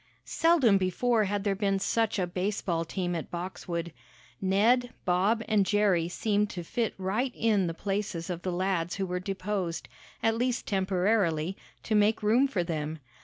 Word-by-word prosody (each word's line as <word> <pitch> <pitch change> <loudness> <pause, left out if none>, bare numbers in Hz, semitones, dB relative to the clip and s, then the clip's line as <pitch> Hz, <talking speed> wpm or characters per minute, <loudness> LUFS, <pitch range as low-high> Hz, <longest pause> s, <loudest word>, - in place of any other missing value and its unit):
Seldom 285 -12 +4
before 215 +5 +1
had 200 0 -1
there 200 -1 +1
been 195 0 0
such 225 +3 0
a 185 - +1
baseball 180 -1 -1
team 175 +1 -2
at 165 -3 -4
Boxwood. 170 -1 -5 0.5
Ned, 225 +6 +3 0.2
Bob 195 +6 +2
and 210 -2 +3
Jerry 195 -4 +2
seemed 210 +2 0
to 175 -3 -5
fit 230 +5 -2
right 210 +8 -1
in 210 -5 +2
the 165 - -3
places 195 -3 -3
of 175 -1 -4
the 185 - -2
lads 180 -1 -1
who 195 - -1
were 180 0 -2
deposed, 190 -2 -3 0.4
at 225 0 +3
least 245 +1 -1
temporarily, 190 -3 +1 0.3
to 220 - -2
make 210 +1 +3
room 235 +6 +4
for 195 -10 -1
them. 160 -2 -3
195 Hz, 165 wpm, -29 LUFS, 180-215 Hz, 0.5 s, Seldom